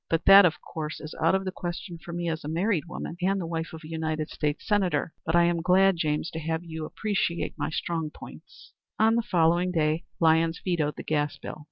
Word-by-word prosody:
"But 165 Hz, 0 st, 0 dB
that, 195 Hz, -1 st, +9 dB
of 175 Hz, +1 st, -3 dB
course, 155 Hz, -1 st, -6 dB
is 155 Hz, -, -8 dB
out 165 Hz, +4 st, +4 dB
of 190 Hz, 0 st, -1 dB
the 185 Hz, -, -2 dB
question 175 Hz, 0 st, -6 dB
for 170 Hz, -, -9 dB
me 170 Hz, 0 st, -3 dB
as 160 Hz, -1 st, -2 dB
a -, -, -6 dB
married 170 Hz, +2 st, 0 dB
woman 170 Hz, 0 st, -6 dB
and 195 Hz, +2 st, +1 dB
the 175 Hz, -, -3 dB
wife 165 Hz, 0 st, -4 dB
of 160 Hz, -, -9 dB
a -, -, -9 dB
United 160 Hz, -1 st, -3 dB
States 150 Hz, -1 st, -2 dB
Senator. 195 Hz, -5 st, +1 dB
But 160 Hz, -, +1 dB
I 175 Hz, -, +6 dB
am 170 Hz, -1 st, +1 dB
glad, 190 Hz, +2 st, +4 dB
James, 155 Hz, +1 st, -1 dB
to 160 Hz, -, -5 dB
have 160 Hz, +1 st, -2 dB
you 160 Hz, -2 st, -6 dB
appreciate 195 Hz, -3 st, -2 dB
my -, -, -2 dB
strong 160 Hz, 0 st, -2 dB
points." -, -, -14 dB, 0.2 s
On 220 Hz, +1 st, +4 dB
the 235 Hz, -, +2 dB
following 175 Hz, -4 st, +2 dB
day 155 Hz, -1 st, 0 dB
Lyons 165 Hz, 0 st, +3 dB
vetoed 160 Hz, -5 st, 0 dB
the -, -, -7 dB
gas 145 Hz, -2 st, -1 dB
bill. 140 Hz, -, -8 dB
165 Hz, 225 wpm, -27 LUFS, 160-180 Hz, 0.2 s, that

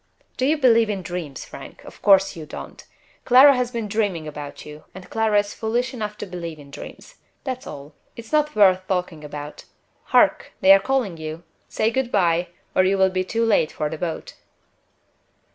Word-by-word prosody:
"Do 260 Hz, -, 0 dB
you 310 Hz, +2 st, +2 dB
believe 230 Hz, -5 st, +4 dB
in 195 Hz, -3 st, -3 dB
dreams, 165 Hz, -6 st, -6 dB
Frank? -, -, -11 dB
Of -, -, -14 dB
course 195 Hz, -1 st, +4 dB
you 160 Hz, -2 st, -8 dB
don't! -, -, -9 dB, 0.4 s
Clara 265 Hz, +3 st, +7 dB
has 250 Hz, -1 st, 0 dB
been 230 Hz, -3 st, -4 dB
dreaming 200 Hz, -7 st, -1 dB
about 145 Hz, -1 st, -8 dB
you; 150 Hz, 0 st, -11 dB
and 190 Hz, -1 st, -10 dB
Clara 220 Hz, -2 st, +2 dB
is 205 Hz, 0 st, 0 dB
foolish 240 Hz, +4 st, -2 dB
enough 210 Hz, -3 st, -5 dB
to -, -, -5 dB
believe 170 Hz, -4 st, -7 dB
in 140 Hz, -2 st, -14 dB
dreams. -, -, -11 dB, 0.3 s
That's 255 Hz, -1 st, -5 dB
all 145 Hz, +1 st, -9 dB, 0.2 s
it's 230 Hz, -1 st, -11 dB
not 300 Hz, 0 st, +1 dB
worth 185 Hz, -2 st, +4 dB
talking 180 Hz, -4 st, -2 dB
about. 150 Hz, 0 st, -8 dB, 0.4 s
Hark! -, -, +3 dB
they 190 Hz, -, +6 dB
are 195 Hz, -, +6 dB
calling 215 Hz, -5 st, -1 dB
you. 160 Hz, +1 st, -7 dB, 0.3 s
Say 220 Hz, +1 st, 0 dB
good 255 Hz, 0 st, -1 dB
by, 175 Hz, -2 st, +2 dB, 0.3 s
or 185 Hz, -, +5 dB
you 195 Hz, +1 st, +2 dB
will 190 Hz, 0 st, +3 dB
be 185 Hz, 0 st, 0 dB
too 230 Hz, +5 st, -1 dB
late 205 Hz, -8 st, +2 dB
for 150 Hz, -, -3 dB
the 160 Hz, -, -4 dB
boat." 170 Hz, -3 st, -4 dB
195 Hz, 190 wpm, -22 LUFS, 165-230 Hz, 0.4 s, Clara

